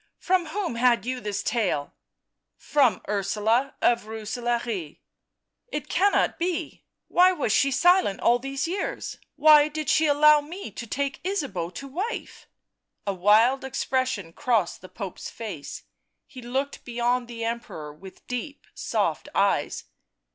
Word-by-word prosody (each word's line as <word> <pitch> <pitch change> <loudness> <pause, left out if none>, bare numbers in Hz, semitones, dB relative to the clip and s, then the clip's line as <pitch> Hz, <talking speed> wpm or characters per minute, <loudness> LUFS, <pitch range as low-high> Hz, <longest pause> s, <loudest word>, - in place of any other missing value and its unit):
"From 365 -2 +1
whom 365 -2 -3
had 240 -1 +3
you 255 0 -2
this 210 -3 -3
tale?" 200 -11 -1 0.4
" - - -58 0.2
From 260 -10 +4
Ursula 210 +6 0
of 235 -2 +3
Rooselaare." 225 -5 -3 0.4
" - - -58
It - - -7
cannot 400 0 +2
be... 345 -1 -3 0.2
why 365 +1 +5
was 290 -10 -1
she 275 +6 +4
silent 355 - +3
all 240 +1 +3
these 275 +3 -3
years? 400 +8 -4 0.2
why 300 0 +7
did 305 -1 -4
she 315 0 +4
allow 300 +1 +6
me 335 - -8
to 235 +4 -7
take 275 +4 -3
Ysabeau 275 - -2
to 275 - -6
wife 375 - -5 0.3
?" - - -54
A 200 - 0
wild 215 +8 +4
expression 260 -8 -2
crossed 225 -7 0
the 185 - -12
Pope's 195 -5 -7
face; 195 -11 -7 0.4
he 260 -4 -11
looked 265 +4 -3
beyond 240 0 0
the 230 -1 -6
Emperor 225 -10 -5
with 185 +5 -14
deep 265 +4 -5
soft - - -1
eyes. - - +1
250 Hz, 145 wpm, -25 LUFS, 215-295 Hz, 0.4 s, why